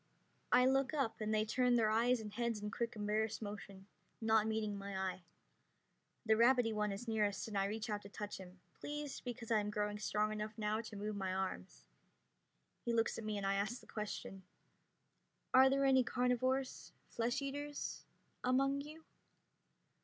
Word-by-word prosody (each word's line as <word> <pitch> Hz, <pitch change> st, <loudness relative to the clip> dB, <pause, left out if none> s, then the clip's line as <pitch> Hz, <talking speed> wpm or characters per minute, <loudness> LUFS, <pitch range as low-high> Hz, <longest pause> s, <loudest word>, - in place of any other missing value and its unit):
I 250 Hz, -, +6 dB
look 270 Hz, +2 st, +2 dB
up, 265 Hz, -7 st, -1 dB
and 215 Hz, 0 st, -1 dB
they 215 Hz, 0 st, +2 dB
turn 250 Hz, +2 st, +3 dB
their 220 Hz, -2 st, +3 dB
eyes 240 Hz, +3 st, +3 dB
and 210 Hz, -2 st, -7 dB
heads 235 Hz, -1 st, -1 dB
in 210 Hz, 0 st, -4 dB
quick 235 Hz, +1 st, -2 dB
embarrassed 215 Hz, +1 st, 0 dB
motion, 200 Hz, -2 st, -7 dB, 0.3 s
not 220 Hz, -1 st, +3 dB
meeting 220 Hz, -2 st, -1 dB
my 200 Hz, -1 st, -5 dB
eye. 190 Hz, -1 st, -2 dB, 1.0 s
The 220 Hz, -, +5 dB
rabbity 235 Hz, 0 st, +5 dB
one 210 Hz, -1 st, 0 dB
is 200 Hz, +5 st, -5 dB
nearest 215 Hz, -2 st, 0 dB
and 215 Hz, -, -6 dB
I 195 Hz, 0 st, +2 dB
reach 215 Hz, +2 st, -3 dB
out 210 Hz, -2 st, -2 dB
to 200 Hz, -, -11 dB
touch 205 Hz, 0 st, -6 dB
him, 180 Hz, -1 st, -12 dB, 0.2 s
pleased 295 Hz, -1 st, -5 dB
because 240 Hz, -2 st, -6 dB
I 220 Hz, -, +5 dB
am 210 Hz, 0 st, -2 dB
growing 210 Hz, -1 st, -1 dB
strong 210 Hz, +1 st, 0 dB
enough 215 Hz, +1 st, -4 dB
now 215 Hz, 0 st, 0 dB
to 225 Hz, -2 st, -9 dB
move 210 Hz, +1 st, -3 dB
my 190 Hz, -2 st, -2 dB
arms. 90 Hz, -, -4 dB, 1.0 s
He 235 Hz, -, 0 dB
looks 225 Hz, 0 st, +1 dB
at -, -, -6 dB
me 215 Hz, -1 st, -2 dB
and 200 Hz, -, -2 dB
I 195 Hz, -, +2 dB
ask 210 Hz, +5 st, -1 dB
the -, -, -17 dB
question: 210 Hz, -2 st, -5 dB, 1.1 s
"Are 260 Hz, +1 st, +8 dB
there 275 Hz, +1 st, +2 dB
any 265 Hz, -1 st, +6 dB
carnivores 255 Hz, +2 st, 0 dB
flesh 235 Hz, +1 st, -1 dB
eaters 290 Hz, +1 st, -4 dB, 0.4 s
among 275 Hz, +2 st, +2 dB
you?" 310 Hz, +3 st, -10 dB
220 Hz, 175 wpm, -37 LUFS, 205-250 Hz, 1.1 s, Are